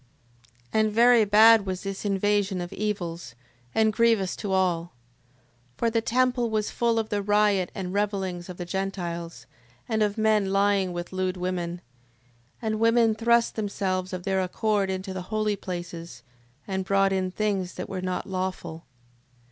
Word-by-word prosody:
6:3. - - +3
And 215 0 +2
very 235 0 +5
bad 215 0 +6
was 185 -1 -3
this 195 +1 -5
invasion 200 -1 +1
of 175 0 -5
evils, 175 - -4 0.4
and 220 -1 +3
grievous 225 -5 +2
to 205 - -4
all. 175 -3 0 0.8
6:4. - - -38
For 235 - +1
the 230 0 +1
temple 245 +1 +1
was 215 -1 -1
full 235 -1 +1
of 220 -1 -1
the 205 -1 -1
riot 205 -2 +2
and 185 -2 -4
revellings 195 -3 -2
of 180 - -7
the 175 - -5
Gentiles: 175 -3 -4 0.4
and 220 -1 0
of 210 0 +1
men 215 -3 +2
lying 195 -1 +2
with 175 +1 -6
lewd 185 0 -1
women. 180 -1 -3 0.8
And 215 -1 -1
women 230 0 +4
thrust 235 +1 +2
themselves 190 -3 -2
of 180 -1 -5
their 190 0 0
accord 200 +2 0
into 190 0 -4
the 185 - -4
holy 215 -1 0
places, 175 -3 -7 0.4
and 190 -1 -2
brought 195 0 +2
in 185 -1 0
things 195 -2 -2
that - - -5
were 185 -1 -4
not 185 0 -3
lawful. 185 -3 -4
195 Hz, 165 wpm, -26 LUFS, 185-215 Hz, 0.8 s, bad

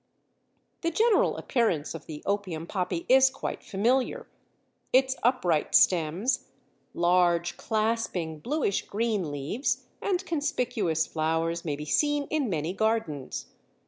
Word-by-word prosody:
The 335 - +1
general 440 +6 +3
appearance 215 - 0
of 165 - -9
the 150 -2 -8
Opium 190 -5 -2
Poppy 180 -2 -2
is 265 +1 +6
quite 270 - -5
familiar; 255 - 0 0.7
its 265 +1 +4
upright 185 - +1
stems, 180 +7 +3 0.5
large, 175 0 +2
clasping, 215 -8 -1
bluish 250 - -1
green 210 -5 -1
leaves 145 - -2 0.2
and 380 -1 -1
conspicuous 245 - 0
flowers 165 +1 -1
may 150 -4 -2
be 150 +1 -7
seen 290 - +2
in 300 -6 0
many 160 -1 -2
gardens. 205 - -1
200 Hz, 115 wpm, -27 LUFS, 165-255 Hz, 0.7 s, is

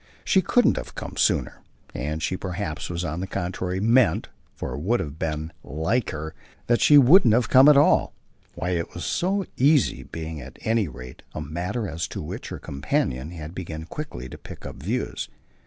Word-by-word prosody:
She 190 - +4
couldn't 245 +7 +3
have - - -6
come - - -6
sooner, - - +1 0.3
and 75 +5 -3
she 95 - 0
perhaps 90 -4 -4 0.2
on 80 +1 -3
the 95 - -3
contrary 90 0 -3
meant 115 +3 +3 0.3
for - - -5
it 65 - -4
would 110 +11 +1
have 75 0 -5
been 80 0 -2
like 95 - -1
her 80 +1 -5 0.3
that 120 0 +2
she 150 - +7
wouldn't 140 - +7
have 120 -2 +1
come 135 +3 +8
at 150 - +7
all; 145 - +4 0.4
why 90 - -2
it 85 -2 -2
was 85 - -4
so 195 +2 0
easy 135 - +3
being 80 +2 -6
at 65 0 -11
any 110 -3 +1
rate 60 -2 -10
a - - -3
matter 90 - -3
as 80 -1 -3
to - - -6
which - - -6
her - - -5
companion 70 0 -2
had 80 -2 -8
begun 80 -4 -6
quickly 150 - -6
to - - -10
pick - - -11
up - - -7
views. 105 - -3
90 Hz, 190 wpm, -25 LUFS, 75-120 Hz, 0.4 s, come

